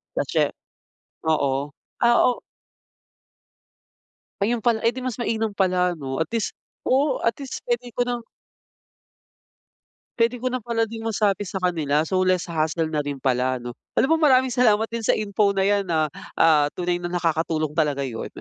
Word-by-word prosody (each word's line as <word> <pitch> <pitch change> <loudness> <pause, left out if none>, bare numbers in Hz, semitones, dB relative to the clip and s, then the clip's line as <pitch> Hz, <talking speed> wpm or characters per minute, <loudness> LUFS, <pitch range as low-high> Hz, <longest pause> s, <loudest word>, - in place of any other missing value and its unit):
kasi - - +1 0.8
oo, 140 -2 +1 0.3
ah, 235 0 +5
o 250 - +2 2.0
ayun 225 +2 0
pala, 230 -2 +3
eh, - - +4
'di 255 - -5
mas 255 -2 -4
mainam 225 -2 -1
pala 180 -2 +1
'no, 135 -2 -4
at 160 - -19
least 230 -2 -2 0.3
oo, 270 +1 +2
at 230 - +1
least 275 -2 -6
puwede 240 0 -1
ko 245 - -2
ng 240 -1 -2 2.0
puwede 230 +1 +3
ko 250 +1 -2
na 255 - -1
pala 230 0 -1
din 225 0 -5
masabi 210 -3 0
sa 190 0 -5
kanila, 155 -4 +1
so 185 +4 0
less 185 -1 +2
hassle 160 0 -1
na 155 - 0
rin 145 -1 -3
pala 130 0 +1
ano. 120 -1 -6 0.2
Alam 320 +4 +3
mo 310 - +5
maraming 260 -1 +4
salamat 220 -3 +4
din 230 - -2
sa 225 - +2
info 200 -1 +1
na 195 - +2
'yan 200 -1 +2
ah, 155 -3 +1 0.2
ah, 155 -3 +5
tunay 175 0 -1
na 175 - -4
nakakatulong 160 -3 0
talaga 150 -3 0
'yun. 120 -4 -4
195 Hz, 165 wpm, -23 LUFS, 155-235 Hz, 2.0 s, ah